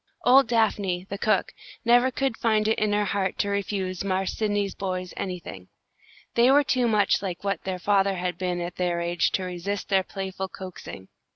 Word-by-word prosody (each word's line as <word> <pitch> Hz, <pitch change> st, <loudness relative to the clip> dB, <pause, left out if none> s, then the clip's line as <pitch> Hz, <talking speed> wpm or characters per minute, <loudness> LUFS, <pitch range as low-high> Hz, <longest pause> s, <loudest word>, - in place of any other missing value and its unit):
Old 265 Hz, +1 st, +6 dB
Daphne, 205 Hz, -5 st, +1 dB
the 200 Hz, -, -4 dB
cook, 215 Hz, -, +1 dB, 0.3 s
never 245 Hz, +2 st, +5 dB
could 265 Hz, -1 st, -1 dB
find 215 Hz, -2 st, +1 dB
it 220 Hz, -, +1 dB
in 215 Hz, -1 st, +1 dB
her 205 Hz, 0 st, +2 dB
heart 195 Hz, -1 st, -1 dB
to 205 Hz, -, 0 dB
refuse 195 Hz, -2 st, -2 dB
"Marse 190 Hz, -1 st, -1 dB
Sydney's" 205 Hz, -2 st, -1 dB
boys 185 Hz, -2 st, -4 dB
anything. 175 Hz, -, -6 dB, 0.7 s
They 235 Hz, +2 st, +5 dB
were 285 Hz, +2 st, +6 dB
too 255 Hz, -3 st, +1 dB
much 210 Hz, -3 st, +2 dB
like 185 Hz, -2 st, -5 dB
what 200 Hz, -1 st, -2 dB
their 190 Hz, -1 st, -2 dB
father 195 Hz, +1 st, +2 dB
had 180 Hz, 0 st, -3 dB
been 180 Hz, -1 st, -1 dB
at 175 Hz, 0 st, -5 dB
their 175 Hz, -1 st, 0 dB
age 170 Hz, 0 st, +1 dB
to 190 Hz, -, 0 dB
resist 185 Hz, +3 st, -4 dB
their 195 Hz, -1 st, +4 dB
playful 190 Hz, 0 st, -5 dB
coaxing. 185 Hz, -, -9 dB
195 Hz, 185 wpm, -25 LUFS, 185-215 Hz, 0.7 s, Old